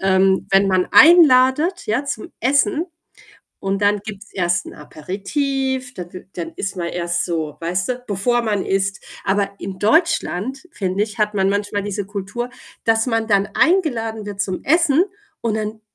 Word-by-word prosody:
ähm, 190 Hz, 0 st, +3 dB
wenn 195 Hz, +1 st, +4 dB
man 185 Hz, -1 st, +2 dB
einladet, 310 Hz, 0 st, +6 dB
ja, 235 Hz, +7 st, 0 dB
zum 220 Hz, -6 st, -5 dB
Essen, 275 Hz, -, +2 dB, 0.7 s
und 195 Hz, +1 st, -2 dB
dann 205 Hz, 0 st, +3 dB
gibt's 205 Hz, -1 st, -9 dB
erst 175 Hz, -2 st, 0 dB
'n -, -, -9 dB
Aperitif, 255 Hz, -, -3 dB
dann 180 Hz, -1 st, -7 dB
i 180 Hz, -, -8 dB
dann 165 Hz, -2 st, -5 dB
ist 195 Hz, -1 st, -4 dB
man 175 Hz, -, -3 dB
erst 170 Hz, 0 st, -2 dB
so 160 Hz, -4 st, -3 dB
weißt 175 Hz, +2 st, -1 dB
du, 250 Hz, 0 st, -4 dB
bevor 235 Hz, +4 st, 0 dB
man 205 Hz, -4 st, -1 dB
isst. 195 Hz, 0 st, -1 dB, 0.2 s
Aber 200 Hz, 0 st, +1 dB
in 190 Hz, -1 st, -6 dB
Deutschland, 265 Hz, -, +1 dB
finde 190 Hz, -, -1 dB
ich, 210 Hz, -2 st, -11 dB
hat 210 Hz, 0 st, +1 dB
man 195 Hz, -1 st, +2 dB
manchmal 205 Hz, 0 st, -1 dB
diese 205 Hz, -1 st, -4 dB
Kultur, 205 Hz, +4 st, -4 dB, 0.4 s
dass 225 Hz, +1 st, +2 dB
man 225 Hz, -2 st, 0 dB
dann 200 Hz, -1 st, +3 dB
eingeladen 235 Hz, -, +1 dB
wird 200 Hz, -1 st, -5 dB
zum 190 Hz, -2 st, -2 dB
Essen 330 Hz, +1 st, +4 dB, 0.4 s
und 225 Hz, -2 st, 0 dB
dann 215 Hz, 0 st, -4 dB
205 Hz, 165 wpm, -20 LUFS, 190-250 Hz, 0.7 s, einladet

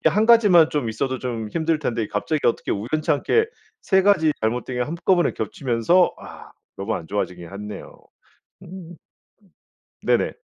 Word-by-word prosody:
이게 -, -, +4 dB
1 215 Hz, +2 st, +2 dB
가지만 205 Hz, -9 st, +6 dB
좀 145 Hz, -6 st, -1 dB
있어도 130 Hz, +4 st, -3 dB
좀 115 Hz, -4 st, -4 dB
힘들 165 Hz, +2 st, 0 dB
텐데 120 Hz, -6 st, -2 dB
이 105 Hz, -, -4 dB
갑자기 145 Hz, +9 st, -2 dB
어떻게 115 Hz, -, 0 dB
우연찮게 155 Hz, -, 0 dB, 0.3 s
3 190 Hz, -1 st, +2 dB
가지 180 Hz, -6 st, +3 dB
잘못된 120 Hz, +3 st, -2 dB
게 -, -, +1 dB
한꺼번에 170 Hz, +5 st, +1 dB
겹치면서 125 Hz, -, +1 dB
와 -, -, -12 dB, 0.3 s
너무 100 Hz, +3 st, -3 dB
안 85 Hz, -, -8 dB
좋아지긴 90 Hz, -3 st, -4 dB
했네요. 105 Hz, +1 st, -9 dB, 0.6 s
음음 175 Hz, -1 st, -10 dB, 1.1 s
네네. -, -, +1 dB
140 Hz, 310 characters per minute, -22 LUFS, 110-175 Hz, 1.1 s, 가지만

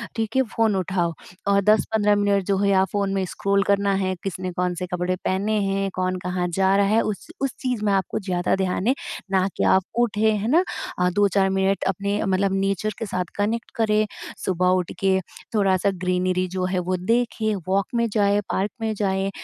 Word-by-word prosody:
ठीक 225 Hz, 0 st, -2 dB
है -, -, +6 dB
फ़ोन 225 Hz, -3 st, +2 dB
उठाओ 180 Hz, -2 st, 0 dB, 0.3 s
और 200 Hz, 0 st, +4 dB
10-15 210 Hz, 0 st, +3 dB
मिनट 200 Hz, -1 st, +2 dB
जो 195 Hz, 0 st, +1 dB
है 200 Hz, +1 st, +2 dB
या 190 Hz, -1 st, +4 dB
फ़ोन 200 Hz, -1 st, 0 dB
में 195 Hz, -1 st, 0 dB
स्क्रॉल 200 Hz, +2 st, 0 dB
करना 200 Hz, 0 st, +2 dB
है। 185 Hz, 0 st, -1 dB
किसने 185 Hz, -1 st, -4 dB
कौन-से 180 Hz, 0 st, -2 dB
कपड़े 180 Hz, +1 st, -1 dB
पहने 190 Hz, +3 st, -1 dB
हैं? 195 Hz, 0 st, 0 dB
कौन 185 Hz, 0 st, -1 dB
कहाँ 180 Hz, 0 st, -2 dB
जा 190 Hz, +2 st, +3 dB
रहा 200 Hz, -, +4 dB
है? 220 Hz, +2 st, +3 dB
उस 210 Hz, -2 st, -4 dB
उस 275 Hz, -1 st, 0 dB
चीज़ 250 Hz, -4 st, -2 dB
मैं 200 Hz, -, +2 dB
आपको 190 Hz, -1 st, 0 dB
ज़्यादा 180 Hz, -3 st, 0 dB
ध्यान 190 Hz, +2 st, -1 dB
है 260 Hz, -, +5 dB, 0.4 s
ना 190 Hz, -1 st, +3 dB
कि -, -, 0 dB
आप 190 Hz, -, +4 dB, 0.2 s
उठे 220 Hz, -2 st, +2 dB
है 210 Hz, 0 st, -1 dB
ना, 340 Hz, +5 st, +5 dB, 0.5 s
2-4 195 Hz, 0 st, +2 dB
मिनट 195 Hz, +1 st, +1 dB
अपने 200 Hz, +2 st, -1 dB
मतलब 195 Hz, +1 st, +1 dB
नेचर 195 Hz, +2 st, 0 dB
के 225 Hz, -, -2 dB
साथ 185 Hz, -3 st, -2 dB
कनेक्ट 220 Hz, +3 st, -1 dB
करें। 215 Hz, -1 st, +2 dB, 0.4 s
सुबह 180 Hz, -1 st, +1 dB
उठके 190 Hz, +2 st, 0 dB, 0.4 s
थोड़ा-सा 195 Hz, -1 st, +2 dB
ग्रीनरी 185 Hz, 0 st, +1 dB
जो 185 Hz, 0 st, -2 dB
है 185 Hz, 0 st, 0 dB
वो 180 Hz, +1 st, -1 dB
देखें, 220 Hz, +2 st, 0 dB
वॉक 195 Hz, +1 st, +2 dB
में 235 Hz, 0 st, +2 dB
जाए, 205 Hz, -1 st, +3 dB
पार्क 195 Hz, +2 st, 0 dB
में 220 Hz, -1 st, 0 dB
जाए 195 Hz, -1 st, 0 dB
195 Hz, 190 wpm, -23 LUFS, 185-210 Hz, 0.5 s, है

